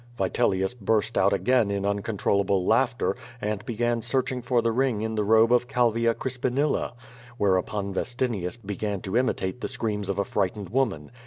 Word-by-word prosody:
Vitelius 95 +1 +1
burst 110 -1 0
out 100 +1 +4
again 100 +3 +2
in 100 0 -1
uncontrollable 100 -2 0
laughter, 120 +3 +2 0.2
and 105 -2 -3
began 120 0 0
searching 125 +1 -1
for 125 0 +1
the 115 0 +1
ring 125 -2 +1
in 110 0 -2
the 105 -1 0
robe 110 +3 +5
of 125 0 +3
Calvia 115 -2 +2
Crispinilla. 130 +3 -1 0.4
Whereupon 100 0 0
Vestinius 115 -4 -2
began 100 -2 -4
to 95 +2 -4
imitate 125 -3 0
the - - -2
screams 105 -3 -3
of 100 - -1
a 100 - +2
frightened 95 0 -2
woman. 110 - -1
110 Hz, 160 wpm, -26 LUFS, 100-120 Hz, 0.4 s, robe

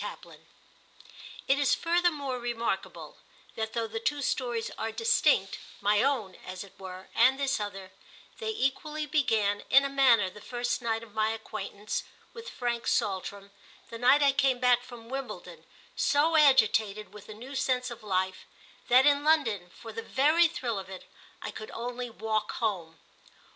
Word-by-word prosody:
II - - -8 1.1
IT 270 +1 +3
is 285 - +3
furthermore 330 -7 0
remarkable 235 -1 -4 0.4
that 220 0 -4
though 230 -1 -1
the 225 0 -5
two 280 +5 -1
stories 240 -3 -1
are 225 +1 -3
distinct—my 210 - +1
own, 245 -9 0
as 185 +1 -7
it 200 - -15
were, 185 0 -9
and 260 +4 +4
this 275 -2 0
other—they 205 - -8
equally 305 -4 -1
began, 220 -9 +1
in 275 +1 +6
a - - -1
manner, 255 -7 +4
the 195 +3 -11
first 245 +2 -2
night 225 -1 -1
of 220 -3 -14
my 215 0 +1
acquaintance 215 -2 -5 0.3
with 460 0 -8
Frank 240 -1 -3
Saltram, 200 -2 -1 0.4
the 230 - -7
night 265 +4 +5
I 280 - +5
came 270 -2 +2
back 245 -1 +4
from 240 -2 -12
Wimbledon 270 +2 -7 0.3
so 305 +3 +2
agitated 220 -8 +4
with 210 0 -13
a 215 - -8
new 250 +6 -10
sense 255 -2 0
of 235 0 -9
life 190 -2 -2 0.4
that, 255 +2 +6
in 285 0 +4
London, 230 - +2
for 225 +5 -11
the 225 - -4
very 305 +8 +3
thrill 235 -9 -3
of 190 - -9
it, 190 -1 -9 0.4
I - - -4
could 215 - -8
only 245 +1 -4
walk 220 -1 -2
home. 180 -8 -2
235 Hz, 160 wpm, -29 LUFS, 210-275 Hz, 1.1 s, in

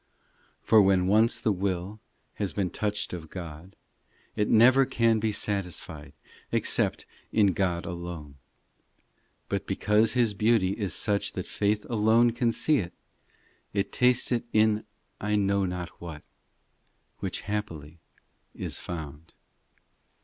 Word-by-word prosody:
v - - -43 0.6
For 110 - +7
when 95 -2 +3
once 110 +4 +3
the 110 - +1
will 95 +1 -3 0.4
Has 100 -3 -2
been 95 -3 -1
touched 105 -2 -3
of 80 -3 -7
God, 85 0 -9 0.6
It 105 - 0
never 130 +4 +6
can 115 -3 +2
be 110 0 0
satisfied 90 -8 -3 0.4
Except - - +2 0.3
in 100 -4 +3
God 90 -2 -1
alone. 85 -5 -7 1.1
But - - -3
because 110 +1 +2
His 120 -4 +2
beauty 105 -2 +2
Is 100 -2 -2
such 100 -1 0
that - - -4
faith 105 0 -1
alone 115 +1 +3
can 120 0 0
see 150 +5 +2
it, 85 -3 -5 0.8
It 100 0 -1
tastes 125 0 +3
it 120 -2 +1
in 110 0 +2 0.3
I 105 +1 -1
know 100 -1 +1
not 90 -1 -4
what, 80 -4 -8 1.0
Which - - -4
happily 85 -7 -5 0.6
is - - -4
found. 80 -2 -8
100 Hz, 130 wpm, -27 LUFS, 90-110 Hz, 1.1 s, For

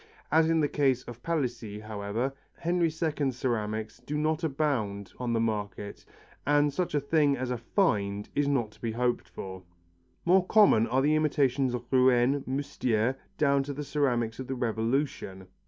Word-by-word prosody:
As 160 +1 +4
in 165 -1 +3
the 145 - +3
case 135 -4 +1
of 120 0 -10
Palissy, 120 -10 -2
however, 110 +4 -3 0.2
Henry 170 0 +1
II 155 -3 -1
ceramics 110 -4 -2
do 150 - -4
not 155 +2 0
abound 125 - -1
on 125 -1 -2
the 115 - +1
market 105 -2 -3 0.4
and 145 0 +3
such 175 0 -1
a - - +4
thing 145 -1 +2
as 125 0 -3
a 125 - -1
find 105 - 0
is 145 0 +1
not 125 -7 0
to - - -22
be 115 -2 -2
hoped 120 -6 -1
for. 95 +1 -7 0.6
More 185 +2 +5
common 200 - +5
are 130 +2 +1
the 150 +2 +3
imitations 140 -4 +2
of 120 0 -6
Rouen, 130 +1 +4
Moustiers, 130 -4 0 0.2
down 140 -2 +3
to 140 +1 -4
the 145 +2 -5
ceramics 125 -6 0
of 130 - -5
the 130 - -3
Revolution. 115 -4 -2
130 Hz, 170 wpm, -28 LUFS, 115-145 Hz, 0.6 s, More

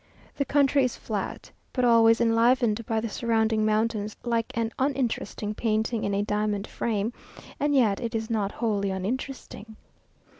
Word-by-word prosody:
The 280 - -1
country 280 -1 +3
is 255 - 0
flat, 205 -4 -5 0.2
but 250 -2 +1
always 230 -1 +5
enlivened 230 0 +3
by 220 -1 0
the 230 - -2
surrounding 220 0 +1
mountains, 215 -1 0
like 230 -2 -1
an 230 -1 0
uninteresting 255 -5 -1
painting 220 +1 -1
in 200 - 0
a 200 - +1
diamond 210 -1 -1
frame; 225 0 -2 0.5
and 290 0 +1
yet 220 -7 +3
it 230 -1 -3
is 220 0 -2
not 210 -3 -1
wholly 205 -4 -1
uninteresting. 220 +2 -5
225 Hz, 150 wpm, -26 LUFS, 215-240 Hz, 0.5 s, always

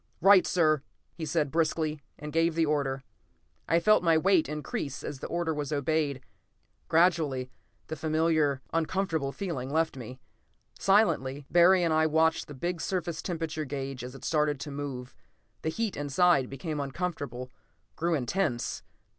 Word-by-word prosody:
"Right, 195 +1 +6
sir!" 155 -5 +3 0.3
he 160 -2 -6
said 145 0 0
briskly, 155 -2 0 0.2
and 150 0 -8
gave 165 0 +2
the 165 -1 +3
order. 140 -3 -1 0.7
I 165 - +4
felt 215 +5 +4
my 165 -2 +4
weight 175 -3 +3
increase 150 -2 -4
as 145 -3 -5
the - - -5
order 170 -1 -1
was 150 -1 -4
obeyed; 145 -2 0 0.7
gradually 160 -7 +2 0.3
the 160 - -5
familiar, 155 -3 +1
uncomfortable 165 -3 0
feeling 150 -8 -4
left 160 +1 +1
me. 125 0 -8 0.6
Silently, 145 -9 +2
Barry 175 +1 +6
and 165 -2 +2
I 160 0 +3
watched 160 +1 +2
the 145 - -9
big 175 +5 -3
surface 175 -3 -2
temperature 160 -3 -3
gauge 135 -3 -5
as 125 +1 -8
it 135 - -10
started 150 -3 +1
to 145 - -5
move. 140 -3 -6 0.5
The 160 - -1
heat 220 +4 -2
inside 145 -1 +2
became 150 +3 -4
uncomfortable, 140 -4 -4 0.4
grew 170 +1 0
intense. 140 -2 -1
155 Hz, 150 wpm, -29 LUFS, 140-170 Hz, 0.7 s, Right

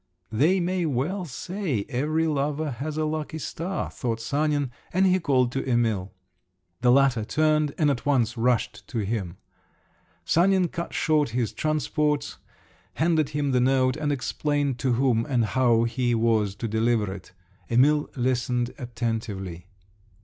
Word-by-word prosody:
"They 155 - +3
may 180 -1 0
well 155 +8 -1
say 165 - -3
every 155 +6 0
lover 150 0 -1
has 145 +5 -5
a 155 - +1
lucky 155 0 -3
star," 170 +4 -4
thought 115 -3 -3
Sanin, 145 +2 0 0.2
and 190 +2 +3
he 185 0 +4
called 130 -7 +2
to 135 - -2
Emil. 115 -7 0 0.7
The 125 0 +4
latter 130 -4 +4
turned 155 +3 +1
and 150 -3 +3
at 125 - -3
once 125 -5 +1
rushed 120 0 0
to 115 -6 -2
him. 95 -5 -3 0.9
Sanin 185 +1 +3
cut 170 +2 -5
short 155 -3 +2
his 120 -3 -1
transports, 150 -1 -1 0.6
handed 160 -2 +2
him 145 -2 -1
the 125 -1 +2
note, 130 0 +3
and 150 -2 -1
explained 145 -1 -1
to 130 -1 +1
whom 120 -2 +2
and 125 -5 +1
how 120 0 +3
he 120 +1 0
was 110 -3 +1
to 115 +3 -4
deliver 110 -2 +1
it…. 95 -2 -11 0.4
Emil 145 +5 +3
listened 125 -1 0
attentively. 110 -8 -4
130 Hz, 145 wpm, -25 LUFS, 115-155 Hz, 0.9 s, he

